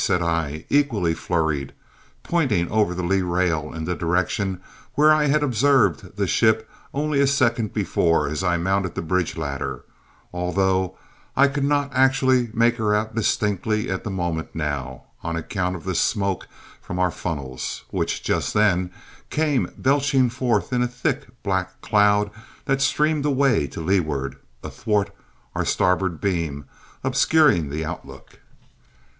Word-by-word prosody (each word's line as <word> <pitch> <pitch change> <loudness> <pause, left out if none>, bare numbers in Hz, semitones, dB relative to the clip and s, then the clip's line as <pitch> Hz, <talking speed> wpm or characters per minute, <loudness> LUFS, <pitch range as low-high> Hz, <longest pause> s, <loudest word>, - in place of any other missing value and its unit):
said 90 -3 +1
I, 80 -2 -2
equally 115 - +2
flurried, 80 -5 -1 0.5
pointing 125 - +1
over 105 -4 +2
the 90 - -3
lee 95 +2 +2
rail 85 -4 0
in 80 -1 -5
the 90 - -1
direction 95 +2 -1 0.4
where 150 +2 +6
I 155 -1 +3
had 150 +1 +2
observed 130 -7 +2
the 100 - +1
ship 110 +3 +2 0.2
only 150 0 0
a 140 - +4
second 120 -5 +1
before 85 -6 +1
as 75 +5 -3
I 90 -2 +2
mounted 95 +1 0
the - - -3
bridge 90 0 -1
ladder, 70 -4 -4 0.5
although 95 +1 0 0.4
I 140 +1 +6
could 140 0 -1
not 145 -1 +1
actually 130 -2 +3
make 120 +2 +2
her 105 -2 +1
out 110 +1 -1
distinctly 105 -1 0
at 95 - -3
the 105 - -4
moment 85 -4 -3
now, 70 -5 -3 0.2
on 85 0 -3
account 90 +2 -2
of 85 - -8
the - - -2
smoke 100 -2 0 0.3
from 90 - -6
our 90 -1 +2
funnels, 70 -7 -5
which, - - -2
just - - -1
then, 95 -4 +3 0.4
came 150 -4 0
belching 135 -2 +2
forth 125 -2 0
in 125 - +2
a 125 - +2
thick, 135 +3 -2 0.2
black 95 -2 -2
cloud 105 0 +3 0.3
that 135 0 +1
streamed 150 +1 +2
away 135 - +2
to - - -7
leeward, 80 -6 0 0.3
athwart 105 -2 -1 0.4
our - - -1
starboard 90 -2 +1
beam, 85 -7 -2 0.4
obscuring 130 - +3
the 80 +3 -3
outlook. - - -9
100 Hz, 150 wpm, -23 LUFS, 85-130 Hz, 0.5 s, where